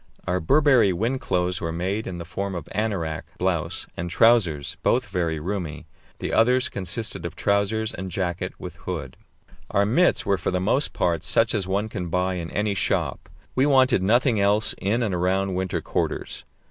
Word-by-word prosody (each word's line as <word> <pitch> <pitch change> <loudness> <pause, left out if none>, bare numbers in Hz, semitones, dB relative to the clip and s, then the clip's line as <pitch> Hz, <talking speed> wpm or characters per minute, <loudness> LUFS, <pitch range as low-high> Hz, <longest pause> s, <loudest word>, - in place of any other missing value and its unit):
Our 90 +1 0
Burberry 130 - +4
wind 115 +9 -1
clothes 90 0 0
were 80 - -2
made 95 +6 -2
in 90 - -5
the 85 - -6
form 95 +2 -4
of 85 -3 -6
anorak 95 -8 -2
(blouse) 90 -1 -1
and 85 +1 -4
trousers, 90 -8 +3
both 125 +1 +2
very 85 -5 -1
roomy. 85 -3 -4 0.3
The - - -4
others 125 +3 +3
consisted 100 0 -2
of 85 -2 -5
trousers 105 +2 0
and 95 +1 -5
jacket 90 -1 -2
with - - -8
hood. - - -5 0.5
Our 100 +1 +2
mits 140 - +3
were 100 -2 +1
for - - -1
the 90 - 0
most 115 +10 +1
part 85 -3 0
such 115 -1 +2
as 100 -4 -1
one 100 +3 0
can 90 -5 -5
buy 90 +2 0
in 85 -2 -4
any 105 0 0
shop; 100 - -1 0.2
we 130 +2 +3
wanted 130 -6 +4
nothing 115 +3 +3
else 100 +2 +2
in 110 +5 0
and 105 -4 -1
around 95 +2 +1
winter 95 0 -2
quarters. - - -3
95 Hz, 180 wpm, -24 LUFS, 90-110 Hz, 0.5 s, Burberry